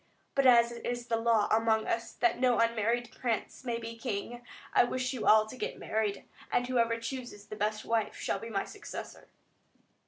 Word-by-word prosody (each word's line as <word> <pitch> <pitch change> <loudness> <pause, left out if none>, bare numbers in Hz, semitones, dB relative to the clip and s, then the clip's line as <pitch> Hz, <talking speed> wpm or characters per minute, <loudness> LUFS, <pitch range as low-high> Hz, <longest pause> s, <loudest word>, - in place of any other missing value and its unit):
But 275 -1 +4
as 235 -1 +6
it 235 - -8
is 240 0 -3
the 230 -1 0
law 225 -2 +3
among 220 0 +3
us, 230 0 -2
that 240 0 +1
no 250 -2 +3
unmarried 230 +1 +1
prince 235 0 -2
may 240 -2 -1
be 230 0 -6
King, 230 +2 -4 0.3
I - - +6
wish 255 +2 -1
you 250 - -3
all 215 0 +7
to 220 - -9
get - - -4
married, 215 -2 -1 0.3
and 245 - +2
whoever 230 -2 +1
chooses 230 -3 -6
the 215 - -8
best 215 +1 -1
wife 225 -2 0
shall - - -2
be 230 - -7
my 200 -3 -1
successor." 415 - -9
230 Hz, 190 wpm, -31 LUFS, 220-240 Hz, 0.3 s, all